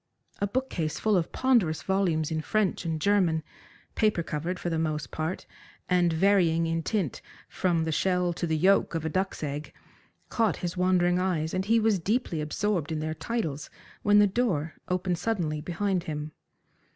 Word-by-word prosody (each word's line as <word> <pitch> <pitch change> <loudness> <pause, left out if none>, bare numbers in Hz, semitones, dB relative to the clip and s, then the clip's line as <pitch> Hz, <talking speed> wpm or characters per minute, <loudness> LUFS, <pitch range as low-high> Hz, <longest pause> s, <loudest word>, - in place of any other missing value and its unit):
A 200 - +1
book 260 +6 -2
case 155 -3 -2
full 215 -1 +2
of 175 -3 0
ponderous 230 - +2
volumes 175 -5 +1
in 160 0 -1
French 205 0 0
and 160 -1 -1
German, 175 -3 +2 0.5
paper 210 -6 +1
covered 165 +4 -3
for 175 - -5
the 165 - 0
most 155 -1 -2
part, 160 +4 -3 0.4
and 180 -2 +3
varying 165 -2 +3
in 165 0 -1
tint 185 - -2 0.3
from 170 -3 0
the 160 - -1
shell 180 +1 +1
to 175 0 -3
the 160 -1 +1
yoke 190 +1 +3
of 160 -1 -2
a - - 0
duck's 190 0 -2
egg, 145 +1 -4 0.6
caught 225 -3 +1
his 175 - -3
wandering 180 -1 +2
eyes, 170 -4 -1
and 185 0 -1
he 230 +2 +4
was 215 -3 +2
deeply 195 -3 -1
absorbed 165 +1 -1
in 155 - -1
their 155 0 -2
titles 160 -3 -3 0.3
when 205 0 +4
the 205 - +7
door 190 -8 0
opened 180 -1 -1
suddenly 175 -7 -1
behind 180 +2 -1
him. 150 0 -4
175 Hz, 175 wpm, -27 LUFS, 160-195 Hz, 0.6 s, the